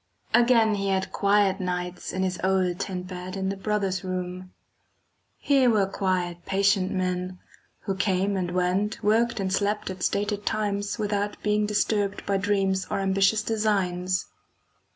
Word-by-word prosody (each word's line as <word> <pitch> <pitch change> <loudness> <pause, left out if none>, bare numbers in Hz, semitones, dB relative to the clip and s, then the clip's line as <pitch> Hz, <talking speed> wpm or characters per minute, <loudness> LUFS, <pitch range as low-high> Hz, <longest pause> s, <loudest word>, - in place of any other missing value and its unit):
Again 235 -2 +5
he 200 -1 -1
had 190 -1 0
quiet 200 -1 +2
nights 180 -1 -3
in 185 - -1
his 185 -1 -2
old 185 -1 +1
tent 185 -2 -4
bed 185 +1 -6
in 190 0 -1
the 195 - -2
brothers' 195 -2 -1
room. 185 0 -5 0.9
Here 270 -3 +3
were 210 -4 +3
quiet 185 -3 -2
patient 195 -1 +2
men, 185 0 -2 0.4
who 195 - -2
came 190 +1 0
and 180 -2 -1
went, 185 +5 0
worked 225 +2 +2
and 190 -1 -1
slept 205 0 0
at 185 -1 -9
stated 205 +2 -1
times 205 -1 -1
without 205 -1 -1
being 210 0 +1
disturbed 205 -1 0
by 200 -1 +1
dreams 195 -1 0
or - - -1
ambitious 195 +2 +2
designs. 185 -5 0
195 Hz, 150 wpm, -26 LUFS, 185-205 Hz, 0.9 s, Again